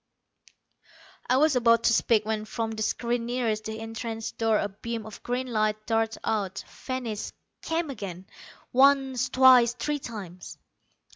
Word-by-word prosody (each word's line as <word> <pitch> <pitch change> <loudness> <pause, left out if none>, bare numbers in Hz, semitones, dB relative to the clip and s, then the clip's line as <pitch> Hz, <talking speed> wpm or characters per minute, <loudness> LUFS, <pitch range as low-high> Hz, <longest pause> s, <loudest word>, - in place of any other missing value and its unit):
I 255 - +4
was 300 0 +4
about 230 -2 +4
to 230 - +4
speak, 215 -2 +3
when 215 -1 -2
from 225 0 -3
the 220 0 -5
screen 235 +1 -1
nearest 230 -3 -1
the 220 0 -5
entrance 225 0 -5
door 225 -1 +1
a 205 - 0
beam 225 +3 -6
of 220 - -10
green 250 +1 -2
light 215 -3 -1
darted 225 0 0
out, 200 -3 -2 0.2
vanished, 245 -5 -3 0.3
came 325 -2 -2
again. 195 -6 -7 0.5
Once, 270 -1 +4
twice, 255 -2 +6
three 290 +5 -2
times. 195 -8 -8
230 Hz, 145 wpm, -27 LUFS, 215-250 Hz, 0.5 s, twice